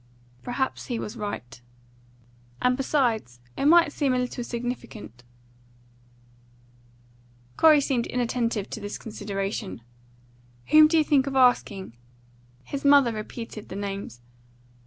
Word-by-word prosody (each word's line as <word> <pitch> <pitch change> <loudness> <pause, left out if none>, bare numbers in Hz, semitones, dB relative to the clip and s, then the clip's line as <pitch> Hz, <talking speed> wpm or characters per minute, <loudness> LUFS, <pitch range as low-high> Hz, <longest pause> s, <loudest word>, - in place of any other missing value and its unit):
"Perhaps 255 +2 -3
he 240 - -2
was 215 +1 -6
right." 135 - -6 1.0
"And 250 0 +2
besides, 240 - 0 0.2
it - - -2
might 335 0 +6
seem 275 -4 0
a - - +1
little 250 -1 -3
significant." 235 - -6 2.3
Corey 310 -2 +6
seemed 260 -4 -1
inattentive 235 -4 -1
to - - -5
this 205 -1 -6
consideration. 200 - -5 0.9
"Whom 310 0 +8
did 325 +1 +2
you 315 - +5
think 285 -3 +2
of 275 - -3
asking?" 225 - +2 0.7
His 280 - -6
mother 280 -4 +5
repeated 215 0 -7
the - - -7
names. 200 -10 -5
240 Hz, 115 wpm, -25 LUFS, 205-270 Hz, 2.3 s, Whom